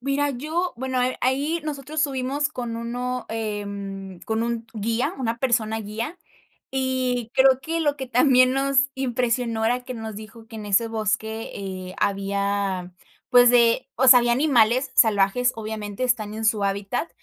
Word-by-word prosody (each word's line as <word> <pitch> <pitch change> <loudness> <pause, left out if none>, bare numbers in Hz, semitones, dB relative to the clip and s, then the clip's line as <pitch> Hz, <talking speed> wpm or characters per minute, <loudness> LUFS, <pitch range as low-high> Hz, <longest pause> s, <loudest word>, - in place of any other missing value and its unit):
Mira, 275 +2 0
yo 315 +7 -2
bueno, 260 0 -1
eh, 255 +1 0
ahí 280 +6 0
nosotros 300 0 -4
subimos 280 0 0
con 240 -6 -5
uno 245 +1 -4
em, 200 -4 -5
con 220 0 -2
un 230 -1 -3
guía, 230 - -1
una 235 -2 -2
persona 225 -3 0
guía, 220 - -5 0.6
y 255 -3 -1
creo 265 0 +5
que, 330 +4 -2
lo 290 -2 +1
que 265 -2 -5
también 255 0 +4
nos 275 0 +2
impresionó 245 -3 -1
era 245 +2 0
que 255 0 -6
nos 220 -3 -6
dijo 220 +1 -11
que, 225 - -11
en 215 -1 -7
ese 205 +3 +2
bosque, 220 0 -2
eh, 185 -2 -6
había, 200 -2 -1 0.4
pues, 245 -1 +7
de 235 -1 +4
o 260 +2 +2
sea, 250 -1 +10
había 240 0 +1
animales 255 -2 +3
salvajes, 220 +2 +3
obviamente, 215 0 -5
están 220 -4 0
en 220 +1 -4
su 215 -2 +2
hábitat, 200 +10 -2
235 Hz, 160 wpm, -24 LUFS, 215-260 Hz, 0.6 s, sea